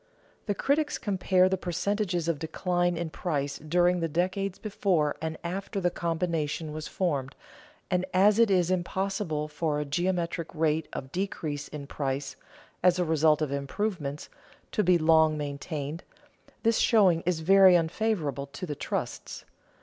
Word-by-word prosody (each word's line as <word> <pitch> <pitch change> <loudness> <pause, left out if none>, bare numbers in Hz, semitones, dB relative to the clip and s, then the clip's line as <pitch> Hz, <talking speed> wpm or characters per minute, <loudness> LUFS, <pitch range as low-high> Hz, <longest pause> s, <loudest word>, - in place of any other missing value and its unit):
The 205 - 0
critics 290 +5 +1
compare 185 -2 +2
the 190 0 -1
percentages 180 -1 -1
of 165 -4 0
decline 175 +2 0
in 165 -1 -3
price 145 -5 -2
during 175 +3 +2
the 165 - 0
decades 185 +4 -1
before 185 -8 0
and 160 0 -3
after 195 +3 -3
the 175 -2 +1
combination 165 -2 -2
was 155 0 -5
formed, 140 -8 -2 0.6
and 180 0 +2
as 200 +4 +4
it 230 -2 +5
is 180 -2 +2
impossible 185 -3 -1
for 150 0 -1
a 150 - -2
geometric 170 +2 -2
rate 160 0 +1
of 130 0 -6
decrease 155 -6 -3
in 150 -2 -7
price, 135 -1 -3 0.5
as 180 -1 +4
a 180 - +1
result 155 -1 +3
of 145 - -2
improvements, 145 +1 -3 0.4
to 210 - +1
be 180 0 +5
long 160 -1 +4
maintained, 145 +2 -5 0.6
this 230 -1 +3
showing 190 -8 +4
is 175 -3 +1
very 190 +2 +7
unfavorable 165 -5 -1
to 185 +7 -7
the 150 - -4
trusts. - - -5
170 Hz, 150 wpm, -28 LUFS, 150-185 Hz, 0.6 s, very